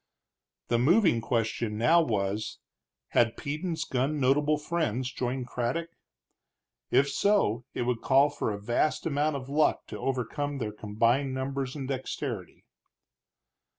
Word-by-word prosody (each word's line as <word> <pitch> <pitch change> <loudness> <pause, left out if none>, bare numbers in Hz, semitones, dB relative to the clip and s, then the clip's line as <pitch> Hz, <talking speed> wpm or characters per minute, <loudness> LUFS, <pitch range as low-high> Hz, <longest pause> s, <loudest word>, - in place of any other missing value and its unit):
The 120 - +2
moving 165 - +4
question 115 -2 -1
now 165 +10 +5
was, 105 -6 -1 0.5
had 115 -1 +2
Peden's 160 +4 -3
gun 135 +4 -1
notable 145 +3 +3
friends 135 - -1
joined 125 0 -2
Craddock? 125 +8 -2 1.0
If 140 - +4
so, 140 - +2
it - - -1
would 120 -1 -1
call 140 +2 +4
for 110 - -2
a 100 - -4
vast 120 +8 0
amount 150 -1 +1
of 130 -2 -5
luck 150 +3 +2
to - - -6
overcome 135 +3 -2
their 110 -5 -3
combined 115 +6 +1
numbers 135 0 -3
and 135 -3 -5
dexterity. 130 - -5
130 Hz, 130 wpm, -28 LUFS, 115-145 Hz, 1.0 s, now